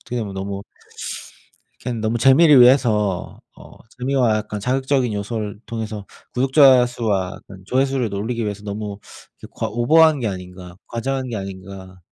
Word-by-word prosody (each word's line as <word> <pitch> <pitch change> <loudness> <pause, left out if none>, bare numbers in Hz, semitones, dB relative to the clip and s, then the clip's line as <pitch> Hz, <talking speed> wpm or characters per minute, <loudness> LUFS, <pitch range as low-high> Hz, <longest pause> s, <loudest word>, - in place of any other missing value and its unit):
어떻게 125 - -5
보면 105 -4 -5
너무 100 +1 -5 1.2
그냥 120 -2 -3
너무 110 +2 -1
재미를 135 +4 +6
위해서 110 -7 +3 0.2
어 - - -14 0.3
재미와 125 -4 +1
약간 105 -1 -4
자극적인 130 +1 0
요소를 105 0 -4
통해서 110 -3 -5 0.3
구독자 130 -1 +5
수와 105 -6 -2
약간 95 -1 -14
조회수를 130 -4 0
올리기 115 +3 -3
위해서 105 -1 -4
너무 105 0 -5 0.4
이렇게 - - -12
과 - - -1
오버한 155 +5 +4
게 115 - -1
아닌가, 90 -1 -9
과장한 130 +3 -3
게 115 - -4
아닌가 95 -1 -9
110 Hz, 345 characters per minute, -20 LUFS, 100-130 Hz, 1.2 s, 재미를